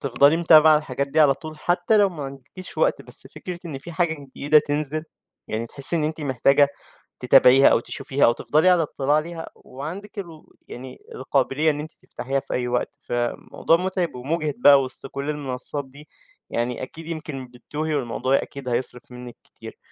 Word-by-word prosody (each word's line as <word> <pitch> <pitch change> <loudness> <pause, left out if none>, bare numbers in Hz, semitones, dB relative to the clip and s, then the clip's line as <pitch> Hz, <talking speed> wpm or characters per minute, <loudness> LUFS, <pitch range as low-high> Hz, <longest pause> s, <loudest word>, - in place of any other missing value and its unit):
تفضلي 140 +3 +3
متابعة 160 -2 +6
الحاجات 140 -2 -4
دي 155 +3 +1
على 145 -3 +5
طول 155 +1 -10
حتى 175 +6 +1
لو 205 -1 +5
ما 165 -6 -8
عندكيش 135 +7 -10
وقت، - - +1
بس - - -8
فكرة 180 -2 -7
إن 145 -5 -6
في 170 +5 -10
حاجة 170 -1 0
جديدة 145 +3 +3
تنزل 150 +1 -2 0.4
يعني 110 +2 -3
تحسي 140 +7 +3
إن 155 - 0
أنتِ 155 +1 -3
محتاجة 140 +1 +3 0.5
تتابعيها 130 +1 +6
أو - - +4
تشوفيها 135 +3 -1
أو 120 - +5
تفضلي 155 +8 +2
على 180 -2 +4
اطلاع 145 -1 0
عليها 165 +2 -3
وعندِك 175 +11 -8
ال 165 -5 -9 0.2
يعني 130 +1 -10 0.2
القابلية 135 +3 0
إن 145 - -5
أنتِ 155 +2 -7
تفتحيها 135 +2 -4
في - - -7
أي 125 0 -1
وقت، 125 +3 -2
فموضوع 120 +7 -1
مُتعب 185 -2 -2
ومُجهد 150 +3 -2
بقى 140 +2 +7
وسط 130 +1 -8
كُل 140 +2 -5
المنصات 145 -1 -4
دي 140 +3 -16 0.4
يعني 120 +2 -2
أكيد 160 +5 -10
يمكن 155 -5 -6
بتتوهي 150 +5 -5
والموضوع 130 0 0
أكيد 140 -2 -8
هيصرف 125 0 -3
منِك 125 -1 -10
كتير. - - -13
145 Hz, 175 wpm, -23 LUFS, 130-160 Hz, 0.5 s, بقى